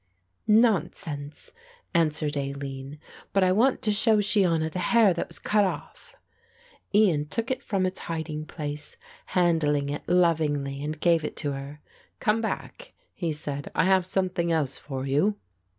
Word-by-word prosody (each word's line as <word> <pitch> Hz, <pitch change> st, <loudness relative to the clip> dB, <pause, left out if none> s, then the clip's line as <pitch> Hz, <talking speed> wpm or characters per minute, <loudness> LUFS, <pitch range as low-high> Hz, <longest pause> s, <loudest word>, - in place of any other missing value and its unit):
"Nonsense," 185 Hz, -9 st, +1 dB, 0.4 s
answered 155 Hz, -2 st, +1 dB
Aline, 140 Hz, 0 st, -5 dB, 0.4 s
"but 195 Hz, -, +4 dB
I 185 Hz, -, +4 dB
want 240 Hz, +7 st, +2 dB
to 215 Hz, -, +2 dB
show 220 Hz, +1 st, +3 dB
Shiona 190 Hz, -7 st, +2 dB
the 180 Hz, -, -4 dB
hair 210 Hz, +2 st, +4 dB
that 170 Hz, -, -3 dB
was -, -, -11 dB
cut 210 Hz, -1 st, +2 dB
off." 190 Hz, -, -5 dB, 0.8 s
Ian 180 Hz, -8 st, +3 dB
took 230 Hz, -, -3 dB
it 255 Hz, -, -2 dB
from 195 Hz, -3 st, 0 dB
its 185 Hz, +1 st, -2 dB
hiding 160 Hz, -2 st, -4 dB
place, 150 Hz, -2 st, -6 dB, 0.3 s
handling 155 Hz, -5 st, +2 dB
it 145 Hz, -, -3 dB
lovingly 150 Hz, -6 st, +1 dB
and 155 Hz, +1 st, -4 dB
gave 170 Hz, -1 st, +3 dB
it -, -, -5 dB
her. 145 Hz, 0 st, -5 dB, 0.4 s
"Come 225 Hz, 0 st, +2 dB
back," 220 Hz, -, -5 dB, 0.2 s
he 170 Hz, -3 st, -2 dB
said, 145 Hz, -2 st, -5 dB
"I -, -, +3 dB
have 190 Hz, 0 st, +4 dB
something 185 Hz, -3 st, 0 dB
else 150 Hz, -5 st, 0 dB
for 135 Hz, -2 st, -5 dB
you." 150 Hz, +10 st, +2 dB
165 Hz, 150 wpm, -26 LUFS, 145-195 Hz, 0.8 s, but